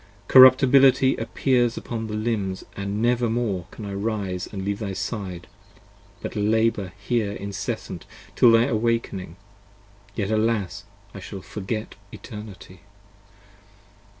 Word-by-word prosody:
p. - - -9
83 - - -8
CORRUP[T]ABILITY 130 +1 +7
appears 120 -3 +1
upon 115 -2 -4
thy 105 - -4
limbs, 105 -4 -2
and 100 +2 -3
never 120 0 +2
more 110 -7 -2
Can 110 - -9
I 100 - -5
arise 100 -3 -3
and 95 -2 -5
leave 100 0 -2
thy 100 -3 -4
side, 95 -4 -5 0.8
but - - -5
labour 105 -3 +1
here 105 0 -1
incessant 100 -1 -5 0.3
Till 120 - +6
thy 115 0 +5
awaking: 115 - -1 0.8
yet 105 -1 -2
alas, 110 -4 0 0.3
I 100 - -8
shall 95 +1 -8
forget 105 +3 -5 0.2
Eternity! 105 -5 -10
105 Hz, 125 wpm, -24 LUFS, 100-115 Hz, 0.8 s, CORRUP[T]ABILITY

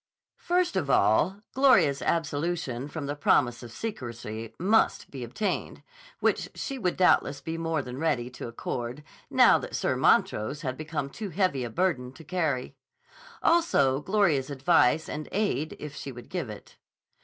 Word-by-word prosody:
First 355 - +1
of 165 -7 -1
all, 165 - +3
Gloria's 190 - +4
absolution 145 -5 -1
from 150 -1 -5
the 145 +1 -3
promise 125 -4 +2
of 120 -2 -9
secrecy 115 - -6
must 210 +5 +2
be 135 -3 -6
obtained, 165 - -3 0.4
which - - +1
she 275 -2 -4
would 180 -6 -1
doubtless 145 -6 +3
be 160 - -5
more 165 -3 -1
than 125 +1 -7
ready 145 -7 0
to 125 - -7
accord, 120 +3 -5 0.3
now - - +6
that - - -6
Sir - - 0
Montrose 110 +9 +2
had 130 -2 -2
become 150 -2 -4
too 210 +4 -6
heavy 175 -7 0
a 120 - -4
burden 130 -4 0
to 160 - -13
carry; 155 -7 -1 0.7
also 145 - +3
Gloria's 170 -9 +2
advice 145 +1 +3
and 150 0 -5
aid 195 -7 -1
if 150 -1 -8
she 140 - -6
would 120 -1 -11
give - - -3
it. - - -11
150 Hz, 155 wpm, -27 LUFS, 130-180 Hz, 0.7 s, now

